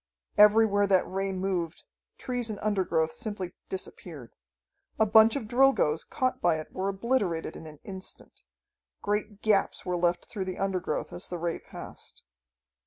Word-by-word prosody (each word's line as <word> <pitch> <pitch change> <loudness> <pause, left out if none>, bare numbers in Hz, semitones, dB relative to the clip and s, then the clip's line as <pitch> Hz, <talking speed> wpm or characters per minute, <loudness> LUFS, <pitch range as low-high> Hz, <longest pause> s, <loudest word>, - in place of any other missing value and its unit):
Everywhere 210 -1 +6
that 190 -2 +3
ray 195 +1 -2
moved, 185 -3 -2 0.3
trees 245 -2 -2
and 215 - -4
undergrowth 180 -6 +1
simply 205 -6 -5 0.2
disappeared. 160 - -7 0.6
A 220 - +4
bunch 220 +1 +6
of 255 -6 -3
Drilgoes, 245 - +3
caught 255 -1 -1
by 170 -2 +3
it, 155 - -8
were 190 +1 -1
obliterated 195 -5 -1
in 160 - -9
an 150 -1 -11
instant. 190 -1 -9 0.6
Great 210 0 -2
gaps 205 -3 +2
were 180 - -1
left 175 0 0
through 195 -2 -4
the 185 -1 -4
undergrowth 195 -2 -2
as 175 - -6
the 180 - -3
ray 170 0 -2
passed. - - -11
195 Hz, 150 wpm, -28 LUFS, 175-215 Hz, 0.6 s, Everywhere